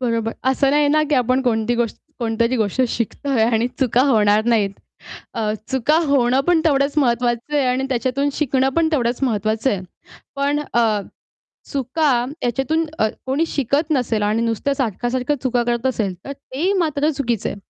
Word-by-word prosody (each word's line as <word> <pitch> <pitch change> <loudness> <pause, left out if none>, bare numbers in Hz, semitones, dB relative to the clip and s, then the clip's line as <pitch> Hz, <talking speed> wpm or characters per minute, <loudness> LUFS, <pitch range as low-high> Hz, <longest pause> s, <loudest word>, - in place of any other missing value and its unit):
बरोबर 230 -2 -1 0.2
असं 270 +1 +2
नाही 295 0 +3
ना 305 +1 +3
की - - +4
आपण 255 +1 +2
कोणती 235 -1 +1
गोष्ट 235 -2 -1 0.2
कोणतरी 230 +1 0
गोष्ट 215 +3 0
शिकतोय 235 +2 -1
आणि 230 0 +1
चुका 250 0 +3
होणार 210 -1 +3
नाहीत 205 -3 +2 0.6
अ, 215 -1 -1 0.2
चुका 265 +4 +2
होणं 265 -2 +3
पण 345 -2 +4
तेवढंच 280 -1 +2
महत्त्वाचं 240 +1 0
आहे 280 - +2
आणि 255 +1 0
त्याच्यातून 260 +3 0
शिकणं 265 -2 +1
पण 330 -1 +3
तेवढंच 240 -2 0
महत्त्वाचं 220 0 0
आहे. 195 - -1 0.6
पण 285 +1 0
अ, 225 -3 +2 0.7
चुका 280 +3 0 0.3
याच्यातून 270 +7 0
अ, 215 - +3 0.2
कोणी 290 +5 +1
शिकत 285 +4 -1
नसेल 240 -6 0
आणि 215 +2 +1
नुसत्या 230 +5 -1
सारख्या-सारख्या 250 +3 -1
चुका 245 -2 +1
करत 240 +1 -1
असेल, 215 -7 -1
तर 280 - -5
ते 280 +7 -3
मात्र 300 0 0
चुकीचं 240 -7 -2
आहे. - - -5
250 Hz, 165 wpm, -20 LUFS, 230-280 Hz, 0.7 s, की